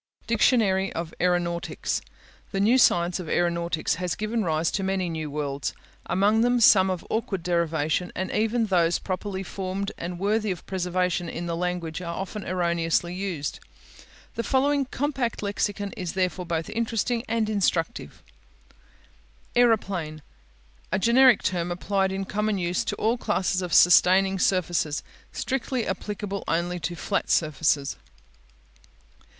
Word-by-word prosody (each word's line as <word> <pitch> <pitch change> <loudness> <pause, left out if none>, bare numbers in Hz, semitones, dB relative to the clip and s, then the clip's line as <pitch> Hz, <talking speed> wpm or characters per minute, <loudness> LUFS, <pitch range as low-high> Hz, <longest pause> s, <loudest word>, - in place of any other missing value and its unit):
DICTIONARY 210 -4 +2
OF 165 0 -5
AERONAUTICS 175 -1 -1 0.5
The 195 - -2
new 230 +6 +4
science 175 -5 +3
of 170 -4 -6
aeronautics 170 -2 0
has 180 -2 -1
given 215 +1 -1
rise 160 -2 0
to 195 - -1
many 190 -2 -1
new 160 -2 -4
words, 140 -1 -3 0.3
among 200 +5 +3
them 245 +1 +3
some 190 -4 +6
of 185 -2 -3
awkward 200 -5 -2
derivation, 170 -1 0
and 185 0 -3
even 225 +2 +1
those 175 -4 +2
properly 190 0 -4
formed 195 +1 -4
and 175 +1 -4
worthy 210 +3 0
of 180 -3 -4
preservation 180 -2 -1
in 170 +1 -5
the 170 -1 -2
language 180 -1 -3
are 170 -1 -4
often 195 +3 -5
erroneously 170 -1 0
used. 180 -6 -4 0.7
The - - -2
following 275 +3 +2
compact 265 -5 -2
lexicon 200 0 -2
is 180 -3 -4
therefore 185 -1 -1
both 165 -1 -2
interesting 230 +1 -1
and 225 -1 0
instructive: 200 -2 -1 1.3
Aeroplane 195 -10 +1 0.7
A - - +2
generic 240 +3 +5
term 175 -1 -1
applied 190 +2 0
in 195 0 -3
common 210 +1 -1
use 175 -1 0
to - - -2
all 230 +3 0
classes 190 -3 0
of 180 -2 -4
sustaining 190 +2 +5
surfaces; 175 -5 +1 0.3
strictly 260 -2 -2
applicable 205 -1 -4
only 175 +2 -1
to 175 +2 -3
flat 195 +5 -2
surfaces. 150 -3 +1
185 Hz, 135 wpm, -25 LUFS, 170-210 Hz, 1.3 s, some